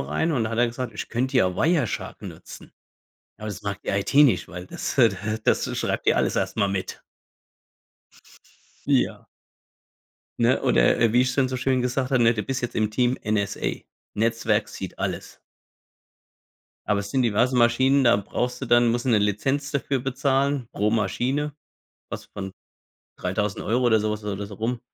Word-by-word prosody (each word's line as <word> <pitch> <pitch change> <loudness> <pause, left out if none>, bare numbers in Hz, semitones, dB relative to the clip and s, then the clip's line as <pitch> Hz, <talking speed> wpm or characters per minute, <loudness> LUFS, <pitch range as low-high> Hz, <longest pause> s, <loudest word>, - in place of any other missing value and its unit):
rein. 75 - -1
Und 120 -6 +1
da 110 - -3
hat 115 - -3
er 120 - +4
gesagt: 120 0 -5
„Ich - - -5
könnte 130 +3 -1
ja 95 -7 +3
Wireshark 155 - 0
nutzen. - - -10 0.6
Aber 110 - -8
das 100 - -7
mag 100 -1 -4
die - - -9
IT 100 +3 -2
nicht, 135 -11 +5
weil 90 +2 -8
das, - - -5
äh, 120 -3 +7
da 100 - -7 0.3
das - - +1
schreibt - - -2
dir - - +4
alles - - +1
erst - - -1
mal 100 -2 +2
mit.“ 95 -1 -4 1.9
Ja. - - +1 1.1
Ne, - - +2
oder 110 - +3
wie 120 - +5
ich 130 - +2
es - - -4
dann 135 -2 +2
so 130 - -3
schön 130 0 +1
gesagt 125 +1 -1
habe, 130 -3 +3
ne: 115 0 +5
„Du 105 - -2
bist 130 +5 -3
jetzt 120 - -3
im 110 -1 +1
Team 125 +3 +1
NSA. 105 -2 -1 0.3
Netzwerk 115 -1 +1
sieht 95 - -8
alles.“ - - -4 1.5
Aber 105 -1 +1
es 100 0 -7
sind 130 - +1
diverse 120 +2 +2
Maschinen, 130 +4 +4
da 120 -4 +5
brauchst 125 +5 -3
du 135 - -4
dann 120 0 +4
musst 120 +1 -1
du - - -1
'ne 110 - +5
Lizenz 135 +8 0
dafür 140 -1 -1
bezahlen. 135 0 0
Pro 105 +1 0
Maschine, 125 +7 -1 0.6
was - - -6
von 95 -1 -7 0.6
3.000€ 105 +5 -1
oder 110 -2 +4
sowas 105 0 -2
oder 105 -2 -3
da 100 - -4
so 100 0 -10
rum. 115 +4 -2
115 Hz, 180 wpm, -24 LUFS, 105-130 Hz, 1.9 s, äh